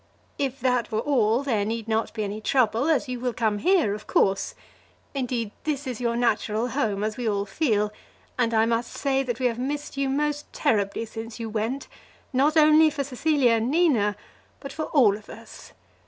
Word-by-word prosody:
If 270 -1 -2
that 250 -1 +1
were 215 - 0
all, 240 -3 +2
there 225 -7 0
need 225 +1 -3
not 225 0 0
be 215 - -1
any 205 +1 -4
trouble, 240 +2 +2
as 305 -5 +2
you 250 -1 -4
will 250 0 -2
come 215 -3 0
here, 345 - +3
of 210 0 -8
course. 195 0 +1 0.6
Indeed, 245 -5 -2
this 295 -2 -2
is 250 -3 -5
your 235 -1 0
natural 230 0 0
home, 220 -6 -1
as 215 0 -2
we 240 -3 -1
all 200 -1 -1
feel; 210 -2 0 0.4
and 240 -2 +1
I 220 -1 +3
must 230 +1 -1
say 270 -1 0
that 240 -3 -3
we 255 - -1
have 240 -1 0
missed 285 +2 -4
you 275 -1 0
most 295 +1 -1
terribly 205 +1 0
since 225 +1 -8
you 225 -1 -5
went, 225 +6 -2 0.5
not 290 +5 +3
only 310 +1 +6
for 290 -2 -3
Cecilia 275 -1 +2
and 230 +1 +1
Nina, 270 -11 +2 0.4
but 275 -1 -8
for 315 - -3
all 235 -9 +4
of 210 0 -13
us. - - -12
240 Hz, 195 wpm, -25 LUFS, 220-275 Hz, 0.6 s, only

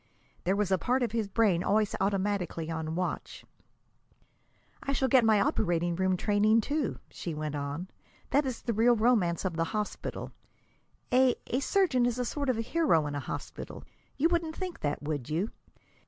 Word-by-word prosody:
There 190 +2 +2
was 205 -2 0
a 190 - +3
part 250 +7 +1
of 235 - -1
his 225 -2 -1
brain 195 -4 +2
always 210 0 +2
automatically 195 -4 -1
on 160 0 -3
watch. 180 +1 -4 1.4
"I 275 - -2
shall 265 -1 +1
get 260 -2 +5
my 220 -2 +5
operating 175 -3 +1
room 185 +1 +1
training, 215 +3 +3
too," 290 0 -1
she 170 -3 -5
went 150 -1 -3
on. 145 +5 -4 0.4
"That 285 +2 +4
is 250 -3 -4
the 235 - -1
real 235 +3 +4
romance 215 -7 +2
of 175 -3 -2
the 165 - +1
hospital. 210 -1 -4 0.8
A 255 0 +5
a 255 - -1
surgeon 280 -7 +2
is 245 0 -1
a 250 - -1
sort 280 +2 -2
of 255 - +3
hero 230 - +2
in 145 - -3
a 145 - -2
hospital. - - -7 0.3
You 300 - +4
wouldn't 335 -2 0
think 370 -2 -5
that, 145 0 -2
would 145 -3 -3
you? 170 +8 -1
205 Hz, 175 wpm, -29 LUFS, 170-250 Hz, 1.4 s, get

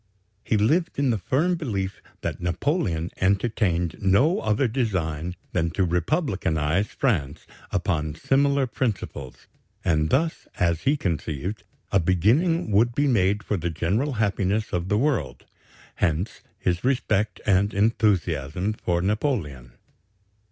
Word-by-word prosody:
He 110 - +1
lived 155 - +1
in 140 -2 +2
the 110 - 0
firm 155 - +1
belief 105 - -3 0.2
that - - -4
Napoleon 90 - -1
entertained 95 -4 +1
no 115 - +3
other 110 +4 +1
design 90 - -2 0.2
than 85 -2 0
to 95 - +3
republicanize 90 - 0
France 80 - -1 0.2
upon 75 -2 -1
similar 140 - +2
principles, 105 - -4 0.4
and 80 -2 +2
thus, 160 +4 0
as 85 -3 +1
he 150 - +3
conceived, 85 - -3 0.3
a 100 - +4
beginning 110 - +2
would 115 +4 +3
be 145 - +2
made 105 -5 +2
for 105 - -1
the 85 0 -2
general 100 - 0
happiness 105 -1 0
of 90 +1 -1
the 105 - +2
world. 135 0 -1 0.5
Hence 85 +6 -1 0.2
his 90 -1 -1
respect 110 -5 0
and 100 +1 +3
enthusiasm 95 - +1
for 85 -5 -1
Napoleon. 95 - -2
100 Hz, 125 wpm, -25 LUFS, 85-120 Hz, 0.5 s, a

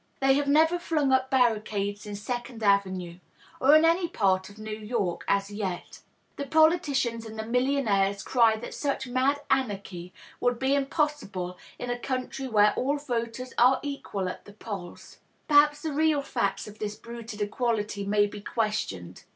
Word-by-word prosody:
They 270 0 +4
have 285 +1 +1
never 320 +4 +4
flung 305 -5 0
up 260 0 +2
barricades 210 -5 0
in 205 - -5
Second 240 +2 -5
Avenue— 185 -4 +1 0.4
or 280 +3 +6
in 310 +1 +6
any 340 +2 +3
part 190 - +1
of 205 - -15
New 215 0 -5
York, 215 -4 -2
as 200 0 +1
yet. 195 -4 -5 0.4
The 280 - -4
politicians 285 -7 +2
and 220 -1 -9
the 220 - -4
millionaires 225 -6 +1
cry 230 -3 +4
that 220 - -7
such 280 -2 -2
mad 260 +3 +1
anarchy 200 -8 -2 0.3
would 245 -1 +1
be 265 +2 +1
impossible 275 - -1 0.2
in 245 - -4
a 245 - -3
country 260 +1 -3
where 210 -3 +4
all 280 +3 0
voters 250 -2 -4
are 255 +2 +5
equal 275 -9 -4
at 180 - -7
the 205 - -13
polls. 200 -4 -8 0.3
Perhaps 295 0 +5
the 315 -2 -2
real 305 -1 +2
facts 215 -8 -2
of 210 0 -12
this 210 0 -3
bruited 235 -1 -9
equality 210 -1 -1
may 205 +1 +3
be 205 0 -7
questioned. 200 - -3
235 Hz, 165 wpm, -27 LUFS, 205-275 Hz, 0.4 s, or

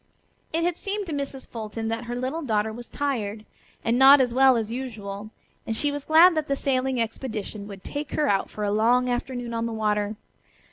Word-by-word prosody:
It 330 +1 0
had 350 0 0
seemed 405 0 -3
to 330 - -5
Mrs. 280 -2 -4
Fulton 225 0 -5
that 225 +1 -3
her 240 +1 -4
little 260 +6 -2
daughter 220 -5 0
was 240 +1 -9
tired, 220 -7 -3 0.4
and 235 +2 +1
not 275 +2 +9
as 250 -2 +2
well 260 -1 +5
as 225 -1 -2
usual, 215 -5 -6 0.4
and 225 -1 -1
she 290 +2 +2
was 285 -1 -5
glad 330 +3 +7
that 310 -1 -1
the 275 - +1
sailing 265 -2 0
expedition 220 -3 -4
would 195 -2 -10
take 290 0 -5
her 300 - +1
out 195 -5 +1
for 210 - -5
a 205 - 0
long 240 +4 +3
afternoon 245 -1 -3
on 230 0 -1
the 230 - -4
water. 210 -1 0
245 Hz, 205 wpm, -25 LUFS, 220-275 Hz, 0.4 s, not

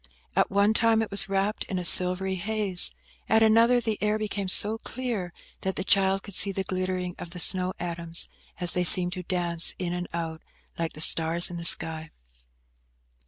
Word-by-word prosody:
At - - 0
one 200 +2 0
time 225 -1 +1
it 215 - -9
was 200 +1 +2
wrapt 195 +2 -3
in 190 - -6
a 180 - -5
silvery 185 +2 +4
haze; 200 -1 0 0.4
at 220 +1 +2
another 230 +3 +2
the 220 -3 -5
air 210 +1 -1
became 205 -2 -5
so 210 +4 +3
clear, 230 -9 -6 0.3
that 190 0 -5
the 190 - -5
child 195 0 0
could 200 - -12
see 195 - +2
the 195 0 -5
glittering 185 -1 -5
of 175 - -9
the 180 +1 -11
snow 185 +2 +1
atoms, 170 -1 -5 0.3
as 175 -2 +6
they 180 - -2
seemed 180 0 +5
to 180 - -6
dance 175 -2 +1
in 175 -2 -5
and 180 0 -6
out, 165 -1 -7 0.4
like 165 -1 -4
the 155 - -10
stars 165 +2 +5
in 175 - -8
the 170 - -7
sky. 160 -1 +3
185 Hz, 190 wpm, -24 LUFS, 175-205 Hz, 0.4 s, as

